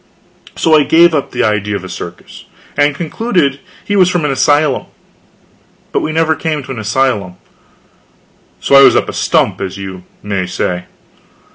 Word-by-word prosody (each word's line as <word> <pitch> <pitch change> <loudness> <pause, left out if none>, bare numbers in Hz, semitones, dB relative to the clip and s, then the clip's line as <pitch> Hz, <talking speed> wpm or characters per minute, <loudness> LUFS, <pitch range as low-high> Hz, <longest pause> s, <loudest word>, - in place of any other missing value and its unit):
So 160 - +1
I 155 -1 +6
gave 165 +3 +4
up 145 -3 -1
the - - -2
idea 105 -1 0
of 95 - -5
a - - -7
circus, 90 -1 -9 0.3
and 145 0 +2
concluded 170 - -1 0.3
he 205 - -1
was 185 -2 +4
from 175 -4 -1
an 150 - 0
asylum. 145 0 +1 1.0
But - - +1
we 155 - -2
never 160 0 +2
came 155 -2 -3
to 130 - -9
an 125 - -5
asylum 105 -4 -1 1.2
so - - -2
I 140 - +9
was - - +6
up - - +1
a - - -5
stump, - - 0
as 95 0 -4
you 95 -2 -8 0.2
may 100 -3 -2
say. 90 0 -3
140 Hz, 170 wpm, -14 LUFS, 100-160 Hz, 1.2 s, I